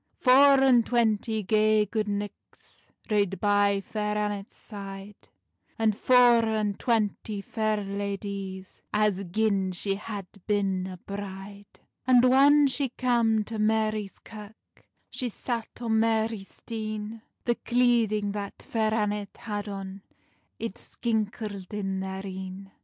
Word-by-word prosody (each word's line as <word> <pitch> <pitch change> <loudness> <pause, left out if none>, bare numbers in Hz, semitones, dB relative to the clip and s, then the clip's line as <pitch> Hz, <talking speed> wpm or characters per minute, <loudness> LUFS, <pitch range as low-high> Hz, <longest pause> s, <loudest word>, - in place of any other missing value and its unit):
Four 275 +2 +7
and 255 -3 +5
twanty 220 -2 +1
gay 215 +1 +3
gude 215 +1 -2
knichts 205 0 -7 0.2
Rade 200 -2 +1
by 205 -1 +3
Fair 210 +1 -2
Annet's 205 -1 -3
side, 200 -1 -10 0.5
And 220 -2 +2
four 245 0 +5
and 215 -2 -1
twanty 215 -3 0
fair 215 +1 -1
ladies, 195 -1 -5
As 210 -2 +1
gin 195 0 +1
she 195 +2 -1
had 200 -1 -6 0.2
bin 195 -3 0
a 185 -1 -7
bride. 200 +1 -9 0.3
And 250 -1 +6
whan 280 +3 +6
she 275 0 0
cam 235 -3 +2
to 220 +1 -6
Marie's 215 -1 0
Kirk, 215 -1 -14 0.2
She 250 - -2
sat 230 0 -4
on 225 -2 +1
Marie's 220 -2 0
stean: 215 -1 -5 0.2
The 240 - +3
cleading 235 -4 +2
that 200 -1 -6
Fair 220 -1 0
Annet 210 -2 -2
had 205 -1 -5
on 195 0 -6 0.6
It 230 -4 -5
skinkled 210 -4 -3
in 195 -2 -2
their 190 +1 -5
een. 190 0 -7
210 Hz, 125 wpm, -27 LUFS, 200-225 Hz, 0.6 s, Four